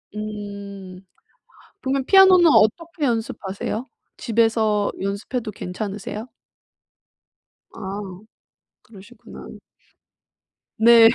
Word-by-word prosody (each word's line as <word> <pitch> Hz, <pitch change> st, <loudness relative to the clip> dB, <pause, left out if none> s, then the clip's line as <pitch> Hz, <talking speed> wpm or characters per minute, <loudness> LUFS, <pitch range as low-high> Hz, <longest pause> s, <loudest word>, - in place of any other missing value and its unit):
음. 200 Hz, -3 st, -7 dB, 0.8 s
그러면 265 Hz, 0 st, -1 dB
피아노는 380 Hz, -2 st, +7 dB
어떻게 315 Hz, +7 st, +2 dB
연습하세요? 225 Hz, 0 st, -3 dB, 0.3 s
집에서 225 Hz, -3 st, +1 dB
연습해도 215 Hz, +4 st, -3 dB
괜찮으세요? 205 Hz, +4 st, -6 dB, 1.5 s
아. 195 Hz, +1 st, -6 dB, 0.8 s
그러시구나. 225 Hz, +3 st, -13 dB, 1.3 s
네. 230 Hz, 0 st, +8 dB
215 Hz, 190 characters per minute, -22 LUFS, 200-240 Hz, 1.5 s, 네